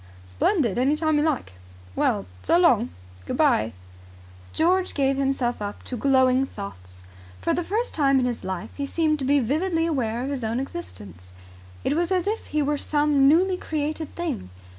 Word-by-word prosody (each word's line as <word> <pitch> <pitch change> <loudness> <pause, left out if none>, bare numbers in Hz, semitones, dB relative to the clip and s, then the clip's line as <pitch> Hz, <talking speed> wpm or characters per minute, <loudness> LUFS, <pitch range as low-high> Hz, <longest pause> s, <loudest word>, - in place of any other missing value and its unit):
"Splendid. 230 - +1
Any 270 +4 +3
time 310 -1 +1
you - - +2
like." 285 - -1 0.4
"Well, 100 -2 +1 0.2
so 335 - +3
long." 340 - +4 0.4
"Good - - -3
bye." 110 +2 +3 0.8
George 365 +3 +1
gave 275 -1 +2
himself 270 -4 -1
up 205 0 -5
to 255 - -4
glowing 260 +1 +3
thoughts. 90 - -10 0.4
For 90 - 0
the 350 - -1
first 440 +8 -2
time 275 -3 +3
in 255 - +2
his 245 -2 -3
life 185 -2 -5
he 280 -1 -3
seemed 310 0 +1
to 270 - -2
be 285 +2 +4
vividly 325 +7 0
aware 245 -7 -1
of 275 - -3
his 265 -4 -3
own 225 +2 -1
existence. 100 - -8 0.5
It - - +1
was 345 +2 0
as 365 -2 +1
if 430 +2 -2
he 300 -1 0
were 290 0 0
some 290 -2 +3
newly 365 +5 +4
created 310 -1 -3
thing. 315 - -4
280 Hz, 180 wpm, -24 LUFS, 240-320 Hz, 0.8 s, long